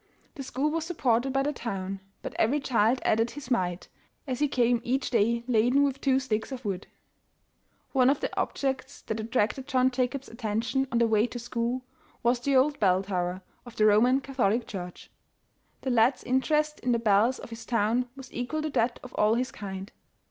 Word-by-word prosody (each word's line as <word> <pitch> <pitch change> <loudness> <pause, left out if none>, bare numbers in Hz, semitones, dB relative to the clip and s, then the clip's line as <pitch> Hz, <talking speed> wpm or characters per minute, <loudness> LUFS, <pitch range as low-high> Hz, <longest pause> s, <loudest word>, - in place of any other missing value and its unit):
The 290 - -7
school 270 +3 -1
was 325 0 -1
supported 270 -7 +1
by 270 +1 +1
the 295 +2 -1
town, 195 -6 -4 0.2
but - - -5
every 265 +7 +3
child 245 -2 +2
added 225 +2 +2
his 275 -1 -9
mite, 180 -6 0 0.4
as 260 -3 -3
he 295 - +3
came 240 -3 +2
each 265 +2 -1
day 235 0 +2
laden 250 +3 +3
with 275 -1 -1
two 265 -1 +3
sticks 225 -2 -2
of 255 -2 -6
wood. 195 -2 -3 1.0
One 260 -2 +4
of 275 - +2
the - - -3
objects 270 0 -2
that 220 0 -3
attracted 225 +3 -1
John 260 -2 +3
Jacob's 255 +2 -2
atten 225 -2 -2
tion 265 +3 0
on 235 - +1
the 235 - +4
way 220 0 +3
to 245 - -7
school, 240 +1 -2 0.4
was 240 +1 +3
the 275 +3 0
old 285 +3 +3
bell 190 -2 +3
tower 185 -1 -2 0.2
of 240 -2 -12
the 215 - +3
Roman 240 +6 +5
Catholic 245 -4 0
Church. 180 -3 -8 0.7
The 265 - -1
lad's 240 +2 +3
interest 300 +4 +1
in 250 -1 0
the - - +3
bells 225 +3 +3
of - - -10
his 230 0 -7
town 235 +2 +1
was 265 -2 -11
equal 275 +6 -3
to 310 - -2
that 235 -2 0
of 250 - -10
all 215 +2 +3
his 250 +2 -1
kind. 195 -1 -7
245 Hz, 195 wpm, -28 LUFS, 220-265 Hz, 1.0 s, Roman